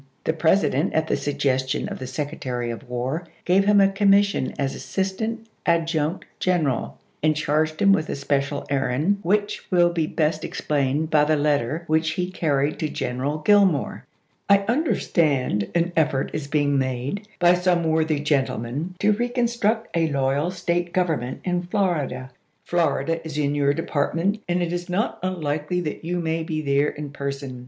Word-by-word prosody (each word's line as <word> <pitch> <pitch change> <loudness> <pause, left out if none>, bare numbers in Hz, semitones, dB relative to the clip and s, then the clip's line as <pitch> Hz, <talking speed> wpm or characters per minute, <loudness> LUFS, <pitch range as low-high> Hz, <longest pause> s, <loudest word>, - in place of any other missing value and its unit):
The 160 - +1
President, 160 -1 +2
at 160 0 +2
the - - 0
suggestion 140 -1 -1
of - - -6
the 130 - -5
Sec 145 +3 -3
retary 125 -6 -3
of 120 +2 -11
War, 130 +8 -3 0.2
gave 190 +2 +3
him 205 0 +5
a 195 - +6
commission 200 -4 +3
as 135 -1 -1
Assistant 220 +4 -3 0.2
Adjutant 165 0 +1
General, 160 -9 0 0.2
and 155 0 +3
charged 155 +1 0
him 200 0 +5
with 155 -5 0
a - - -2
special 140 0 -1
errand 140 +8 +1
which 205 +3 0
will 175 -2 +4
be 165 -2 0
best 155 0 0
explained 145 +2 -1
by 150 -1 +5
the 155 +1 +2
letter 145 +1 0
which 160 0 +1
he 180 +2 -2
carried 145 -4 0
to 155 - -1
General 135 +4 -3
Gillmore: 200 -8 +3 0.3
" - - -38
I 200 0 +5
understand 155 - +1
an 170 +1 +2
effort 140 -4 +1
is 155 -2 -3
being 145 -1 +1
made 130 - -3
by 175 0 +5
some 180 -1 +2
worthy 160 -1 +1
gentlemen 145 +3 -1
to 210 - +4
reconstruct 235 -1 0
a 165 -1 +2
loyal 140 +3 +1
State 175 -1 -2
gov 180 -1 +2
ernment 130 -5 -2
in 180 -1 0
Florida. 155 -9 -1 0.3
Florida 165 -1 0
is 155 -2 -6
in 145 -1 +1
your 140 -1 +2
depart 160 -1 -1
ment, 200 +6 0
and 175 0 +1
it 170 0 -2
is 175 +1 -4
not 200 +6 -1
unlikely 165 -2 -2
that 155 -2 -5
you 175 +2 -2
may 165 -1 -1
be 160 -1 -3
there 140 0 +2
in 145 -1 -7
person. 140 -2 -5
160 Hz, 170 wpm, -23 LUFS, 140-180 Hz, 0.3 s, a